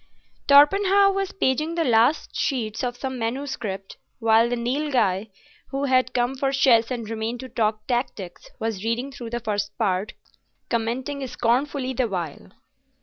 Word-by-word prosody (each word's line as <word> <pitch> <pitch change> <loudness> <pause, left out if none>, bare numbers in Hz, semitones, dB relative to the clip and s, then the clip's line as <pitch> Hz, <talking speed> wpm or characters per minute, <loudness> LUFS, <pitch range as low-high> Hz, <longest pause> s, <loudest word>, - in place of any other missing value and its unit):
Torpenhow 390 +8 +6
was 390 0 -2
paging 305 0 0
the 335 - +1
last 240 +2 +2
sheets 235 -4 -1
of 245 -1 -2
some 260 -1 -4
manuscript, 225 -5 -4 0.2
while 225 0 +4
the 245 - 0
Nilghai, 235 -6 0 0.4
who 275 +1 -3
had 255 -2 +2
come 245 +1 +1
for 270 0 -1
chess 240 -4 +4
and 240 -4 -4
remained 225 +2 -3
to 260 - -8
talk 215 -2 -1
tactics, 240 -8 -3
was 220 -3 -3
reading 235 +4 -1
through 245 -4 -8
the 240 +1 -3
first 205 -3 -3
part, 195 -3 0 0.6
commenting 255 +4 -2
scornfully 255 +3 0
the 255 -1 0
while. 165 - -5
245 Hz, 145 wpm, -24 LUFS, 225-270 Hz, 0.6 s, Torpenhow